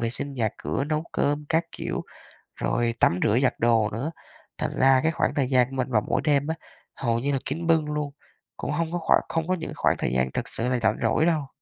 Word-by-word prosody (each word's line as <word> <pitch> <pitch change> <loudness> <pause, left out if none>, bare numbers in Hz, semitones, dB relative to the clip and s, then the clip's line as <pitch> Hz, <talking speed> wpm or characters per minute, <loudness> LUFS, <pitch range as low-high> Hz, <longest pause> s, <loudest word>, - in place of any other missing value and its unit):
vệ 115 0 0
sinh 140 +3 -2
nhà 115 -4 +1
cửa, 135 - -2
nấu 155 +1 -1
cơm 145 +1 0
các 165 +1 +2
kiểu, - - -4 0.5
rồi 120 -1 0
tắm 90 - +3
rửa 110 - +3
giặt 130 - +3
đồ 115 -2 +3
nữa. 130 +10 -3 0.5
Thành - - -2
ra 135 0 +6
cái 160 - +3
khoảng - - 0
thời 135 -3 +1
gian 125 -2 +4
của 135 - -8
mình 130 -1 -1
vào 105 -3 +3
mỗi - - +1
đêm 145 -1 +2
á, 160 - -1 0.4
hầu 115 -2 0
như 140 +4 -1
là 135 - +1
kín 165 +5 -3
bưng 160 -2 +4
luôn, 150 -1 -2 0.5
cũng 140 - -3
hông 165 +2 -1
có 175 - -1
khoảng - - +4
không 165 0 -1
có 185 - +2
những 160 -2 -6
khoảng - - +2
thời - - -1
gian 65 0 +1
thực - - -3
sự 120 +2 0
là 125 -1 +1
rảnh - - +3
rỗi 120 +7 +2
đâu. 155 -5 +1
140 Hz, 250 wpm, -25 LUFS, 120-155 Hz, 0.5 s, ra